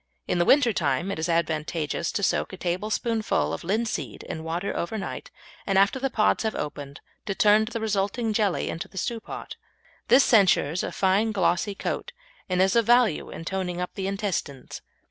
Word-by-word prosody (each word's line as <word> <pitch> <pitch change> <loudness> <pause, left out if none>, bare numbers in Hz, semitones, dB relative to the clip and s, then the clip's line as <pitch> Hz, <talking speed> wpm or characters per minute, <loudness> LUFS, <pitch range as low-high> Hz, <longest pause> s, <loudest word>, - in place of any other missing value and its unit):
In - - 0
the 175 - +3
winter 255 -2 +5
time 160 0 0
it 180 - -4
is 160 +2 -2
advantageous 160 -1 -1
to 200 - -2
soak - - 0
a - - -6
tablespoonful 215 +5 -1
of - - -5
linseed 190 - -2
in 160 - -6
water 170 +4 -3
overnight, 195 +4 -4 0.4
and 195 -1 +2
after 200 +7 +3
the 270 +1 0
pods 215 -4 +2
have 220 -1 -1
opened 145 -1 -6 0.3
to 195 - -1
turn 210 +2 +5
the 230 0 -4
resulting 215 +1 -1
jelly 205 -4 +1
into 165 - -5
the 190 - -15
stew 230 +5 -2
pot. - - -8 0.5
This 265 -1 +5
ensures 180 -6 +4
a - - -3
fine 200 +4 +2
glossy 195 0 +1
coat, 485 - -4 0.4
and 185 0 +3
is 190 +2 +2
of 230 -2 +3
value 240 -7 +3
in 165 - -8
toning 180 -1 -3
up 180 - -4
the 190 -1 -3
intestines. 195 -10 -4
195 Hz, 185 wpm, -25 LUFS, 170-220 Hz, 0.5 s, winter